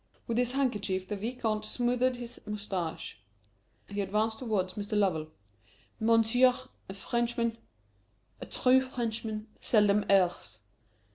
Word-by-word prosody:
With 235 0 0
his 250 0 +2
handkerchief 205 -8 0
the 210 - -3
Vicomte 220 0 -2
smoothed 250 +3 +1
his 245 0 -8
moustache. 190 - -4 0.7
He 200 0 -3
advanced 215 +3 0
towards 200 -7 -1
Mr. 210 +1 -3
Lovell: 175 -7 +1 0.7
"Monsieur, 230 +3 +4 0.3
a 195 - -6
Frenchman 235 +1 -1 0.8
a - - -7
true 260 +1 +4
Frenchman 225 -4 -3
seldom 210 -2 +3
errs. 180 - +2
220 Hz, 115 wpm, -30 LUFS, 200-240 Hz, 0.8 s, Monsieur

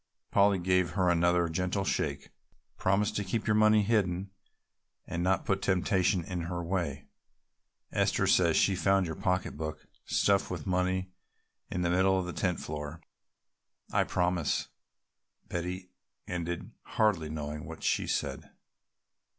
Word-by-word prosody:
Polly 100 -1 +4
gave 90 -1 +1
her 90 -2 +3
another 85 0 +3
gentle 90 +4 -1
shake. - - -2 0.4
"Promise 100 +2 +1
to 100 - -2
keep 105 +3 -2
your 105 - +2
money 110 0 +5
hidden 100 -3 0 0.7
and 85 - -3
not 95 +2 +1
put 95 0 0
temptation 95 -1 +2
in 90 +1 -4
her 85 -1 -3
way. 85 -6 -2 0.9
Esther - - +1
says - - +4
she 95 - +3
found 95 +1 +3
your 80 - -3
pocketbook 80 -3 -2 0.2
stuffed 100 -1 +2
with 90 - -5
money 95 0 0 0.6
in 90 - -2
the 85 - +1
middle 95 +1 +3
of 95 - -1
the 90 - -5
tent 90 -4 -1
floor." 75 +1 -6 0.9
"I - - +3
promise," 90 -3 0 0.8
Betty 90 +1 -4 0.4
ended 85 -1 -4
hardly 95 -8 +1
knowing 75 +1 -5
what 80 -1 -9
she - - +1
said. - - -2
90 Hz, 135 wpm, -30 LUFS, 85-95 Hz, 0.9 s, money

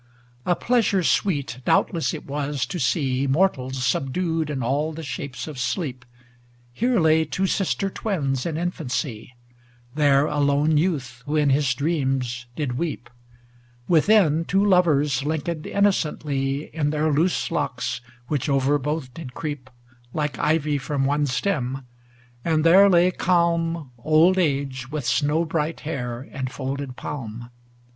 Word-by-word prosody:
LXI - - +3
A - - +4
pleasure 220 -4 +2
sweet 145 -10 0
doubtless 165 +5 +2
it 155 - -7
was 140 -1 -2
to 180 - -5
see 135 -1 +1
Mortals 135 -5 +1
subdued 160 +6 0
in 135 -4 -2
all 145 +6 0
the 165 +1 -7
shapes 140 -1 -5
of 150 -4 -7
sleep. 125 -1 -3 0.7
Here 240 - +1
lay 160 -1 +4
two 190 +4 -1
sister 195 +1 0
twins 145 - -2
in 160 -2 -3
infancy; 140 -8 -3 0.6
There 145 -1 +4
a 150 - -2
lone 145 +2 +3
youth 140 -7 -1
who 150 - -1
in 150 -2 +3
his 140 -1 +2
dreams 135 -4 -1
did 130 -4 -2
weep; 155 -8 -4 0.8
Within, 165 -2 +4
two 195 +4 +1
lovers 150 -8 +3
linked 155 +1 -2
innocently 150 -6 -1
In 150 -2 +1
their 155 0 +1
loose 170 +4 +1
locks 135 -5 -2 0.3
which 145 -1 -1
over 140 +1 +2
both 145 -2 -3
did 130 -5 -9
creep 145 -5 -5 0.5
Like 150 -2 -2
ivy 150 -1 +1
from 135 0 -1
one 145 +1 +1
stem; 135 -3 -1 0.6
and 160 -2 +1
there 190 +5 +7
lay 180 0 +5
calm 170 -4 +1
Old 160 +8 +4
age 135 -6 -1
with 150 -4 -3
snow 150 +7 +1
bright 160 0 -2
hair 125 -5 -4
and 130 -1 -4
folded 135 -1 -4
palm. 120 -5 -7
150 Hz, 140 wpm, -23 LUFS, 135-165 Hz, 0.8 s, there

